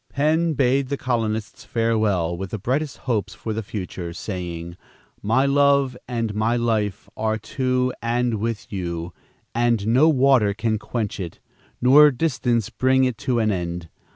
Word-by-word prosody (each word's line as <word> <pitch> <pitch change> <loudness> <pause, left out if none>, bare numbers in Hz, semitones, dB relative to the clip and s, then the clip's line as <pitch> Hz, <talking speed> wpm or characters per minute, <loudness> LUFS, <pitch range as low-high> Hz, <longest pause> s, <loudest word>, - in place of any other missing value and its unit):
Penn 160 +3 +1
bade 135 0 +2
the 140 - -1
colonists 110 -5 -2
farewell, 110 -7 0
with 95 +2 -5
the 110 - -4
brightest 135 +8 -2
hopes 105 -5 -1
for 110 - -4
the 110 - -2
future, 95 -4 -6
saying, 85 -3 -5 0.5
"My 115 +6 +2
love 140 -2 +3
and 115 -3 -2
my 110 +3 +1
life 110 -4 -1
are 110 0 0
to 125 +2 -1
and 120 -1 0
with 115 -1 -4
you, 85 -2 -4 0.4
and 115 -3 +1
no 130 +8 +5
water 130 -8 +4
can 110 0 -1
quench 110 -1 -3
it, 85 -4 -6 0.5
nor 145 +4 +8
distance 125 -5 0
bring 130 0 +2
it 125 -3 0
to 125 -2 0
an 110 -2 +2
end. 85 -2 -4
115 Hz, 155 wpm, -23 LUFS, 100-130 Hz, 0.5 s, nor